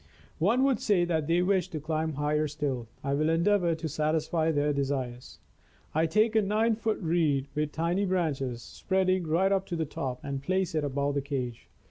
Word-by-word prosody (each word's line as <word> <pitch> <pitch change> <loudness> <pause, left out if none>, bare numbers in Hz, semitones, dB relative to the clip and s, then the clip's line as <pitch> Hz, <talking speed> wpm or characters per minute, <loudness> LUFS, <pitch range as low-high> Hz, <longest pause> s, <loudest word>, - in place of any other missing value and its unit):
One 225 +10 +3
would 270 -4 +2
say 190 -5 +2
that 160 -4 -1
they 170 +2 +3
wished 190 0 +1
to 155 - -2
climb 155 +1 -2
higher 150 +2 0
still. 140 -5 -3 0.2
I 140 +1 -1
will 155 +2 +1
endeavor 170 +1 +2
to 160 0 -4
satisfy 155 +2 0
their 145 -1 +1
desires. 135 -3 -3 0.6
I 160 +2 +2
take 215 +6 +2
a 220 - +5
nine 215 +3 +2
foot 220 0 -1
reed, 160 -6 +1
with 150 0 -1
tiny 170 +6 0
branches 140 -10 -1
spreading 185 -2 0
right 180 +5 +2
up 195 -1 +1
to 175 - -3
the 160 -1 -1
top, 130 -3 -4
and 140 -1 -4
place 185 +3 0
it 155 -2 0
above 140 0 -1
the 140 - 0
cage. 130 -4 -4
160 Hz, 190 wpm, -28 LUFS, 145-185 Hz, 0.6 s, a